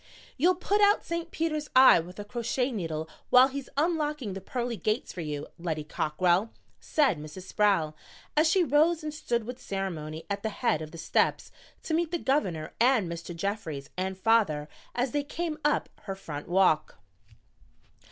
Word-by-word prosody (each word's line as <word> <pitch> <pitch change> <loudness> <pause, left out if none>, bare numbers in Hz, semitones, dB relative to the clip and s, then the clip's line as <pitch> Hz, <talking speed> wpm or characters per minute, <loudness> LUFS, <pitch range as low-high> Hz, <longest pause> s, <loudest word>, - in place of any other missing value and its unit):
"You'll 355 +6 +3
put 405 +3 +1
out 410 0 +4
St. 335 0 -3
Peter's 310 -3 -2
eye 260 -6 +8
with 180 +3 -8
a 205 - -6
crochet 240 +3 -1
needle 160 -7 -3 0.2
while 255 +2 +7
he's 275 -1 -6
unlocking 300 - 0
the 195 - -6
pearly 240 +4 -3
gates 215 +3 -2
for 180 - -5
you, 150 -2 -4
Lettie 160 -3 -2
Cockrell," 175 +7 +1 0.3
said 275 - +2
Mrs. 155 +5 -9
Sproul, 190 -7 +1 0.4
as 310 +1 +4
she 365 +2 +4
rose 315 +1 +3
and 305 -1 -4
stood 240 -6 -1
with 250 +2 -7
ceremony 165 -7 -4
at 200 0 -3
the 220 - -1
head 205 -7 0
of 155 - -6
the 165 - -11
steps - - 0 0.3
to 320 - -3
meet 335 0 +1
the 345 - -1
Governor 190 - -1
and 235 -5 +4
Mr. 170 +1 -6
Jeffries 165 -7 -4
and 190 +1 -2
father 190 -9 +2 0.3
as 245 +1 0
they 290 - +1
came 315 +2 -4
up 295 0 +2 0.2
her 195 - -4
front 150 -6 -7
walk. 175 - +2
215 Hz, 170 wpm, -28 LUFS, -, 0.4 s, eye